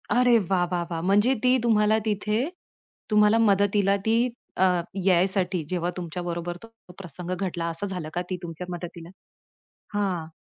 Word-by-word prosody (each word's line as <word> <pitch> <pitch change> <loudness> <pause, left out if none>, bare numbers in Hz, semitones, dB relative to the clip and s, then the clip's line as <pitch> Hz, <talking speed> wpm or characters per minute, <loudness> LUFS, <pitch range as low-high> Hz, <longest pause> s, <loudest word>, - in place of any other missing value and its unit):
अरे 245 0 +4 0.2
वाह, 180 -2 +2
वाह, 175 -1 0
वाह! 165 -1 -2
म्हणजे 205 +5 +4
ती 250 - +4
तुम्हाला 215 -2 +3
तिथे, 210 0 0 0.7
तुम्हाला 210 0 +5
मदतीला 200 0 +3
ती 225 +1 +3 0.4
अ, 185 - +3 0.4
यायसाठी 185 -1 +2
जेव्हा 175 -1 0
तुमच्या 175 0 -5
बरोबर 175 0 -3
तो - - -10 0.3
प्रसंग 180 0 -7
घडला, 175 -3 -3
असं 165 +5 -2
झालं 170 -4 -5
का? 175 - -1
ती 185 - -2
तुमच्या 170 +1 -6
मदतीला 170 -1 -8 0.8
हां. 190 -6 -1
185 Hz, 150 wpm, -25 LUFS, 175-210 Hz, 0.8 s, तुम्हाला